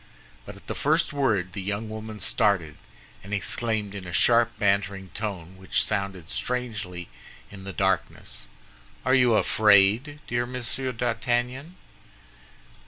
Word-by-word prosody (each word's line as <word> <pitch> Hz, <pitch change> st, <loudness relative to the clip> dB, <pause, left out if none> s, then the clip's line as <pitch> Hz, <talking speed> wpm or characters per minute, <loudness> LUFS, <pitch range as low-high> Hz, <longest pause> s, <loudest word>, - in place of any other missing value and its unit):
But -, -, -8 dB
at -, -, -16 dB
the -, -, -4 dB
first 155 Hz, +2 st, +1 dB
word 105 Hz, -11 st, +1 dB
the 100 Hz, -, -4 dB
young 100 Hz, +3 st, -3 dB
woman 110 Hz, 0 st, -7 dB
started, 100 Hz, -10 st, +1 dB, 0.5 s
and 100 Hz, +2 st, -3 dB
exclaimed 105 Hz, 0 st, -2 dB
in 95 Hz, -3 st, -7 dB
a -, -, -6 dB
sharp, 120 Hz, +4 st, +4 dB
bantering 100 Hz, -1 st, 0 dB
tone, 95 Hz, -4 st, -5 dB
which 95 Hz, -, +1 dB
sounded 95 Hz, -4 st, -3 dB
strangely 105 Hz, -8 st, -3 dB, 0.4 s
in 95 Hz, -2 st, -10 dB
the 100 Hz, -, -4 dB
darkness, 95 Hz, -10 st, -2 dB, 0.6 s
"Are -, -, +3 dB
you 125 Hz, -4 st, +5 dB
afraid, 110 Hz, +8 st, +4 dB
dear 120 Hz, 0 st, -1 dB
Monsieur 125 Hz, +1 st, -3 dB
d'Artagnan?" 120 Hz, +6 st, -1 dB
105 Hz, 130 wpm, -26 LUFS, 95-120 Hz, 0.6 s, you